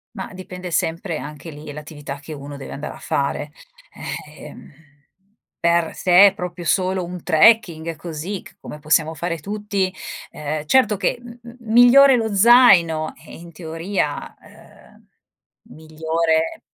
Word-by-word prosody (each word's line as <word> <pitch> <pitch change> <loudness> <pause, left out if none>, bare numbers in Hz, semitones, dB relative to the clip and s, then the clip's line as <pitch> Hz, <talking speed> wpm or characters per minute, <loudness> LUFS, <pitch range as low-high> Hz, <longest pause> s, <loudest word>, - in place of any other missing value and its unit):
Mah, 190 -2 -7
dipende 180 -1 -8
sempre 165 +1 -2
anche 150 +2 -9
lì 150 0 -10
l'attività 145 -1 -8
che 155 +2 -9
uno 140 0 -9
deve 135 - -9
andare 150 +2 -6
a - - -12
fare, 145 +1 -2 0.8
ehm. 150 +1 -14 0.7
Per 170 -1 +2
se 185 +2 +6
è 195 - +1
proprio 180 -2 -7
solo 185 +1 +1
un 175 0 -7
trekking 170 -3 +3
così 170 +5 -6
c - - -16
come 150 - -10
possiamo 155 +1 +1
fare 170 +1 -3
tutti, 200 +1 -3 0.4
ehm, 150 0 -5
certo 215 +1 +3
che 205 - -1
m 240 0 -12
m 235 0 -13 0.2
migliore 255 +3 +7
lo 220 -3 -2
zaino, 190 -9 +5
eh - - -11
in 170 0 -12
teoria, 165 0 -4
uhm, - - -20 0.7
migliore 160 +1 -1
170 Hz, 140 wpm, -21 LUFS, 155-195 Hz, 0.8 s, migliore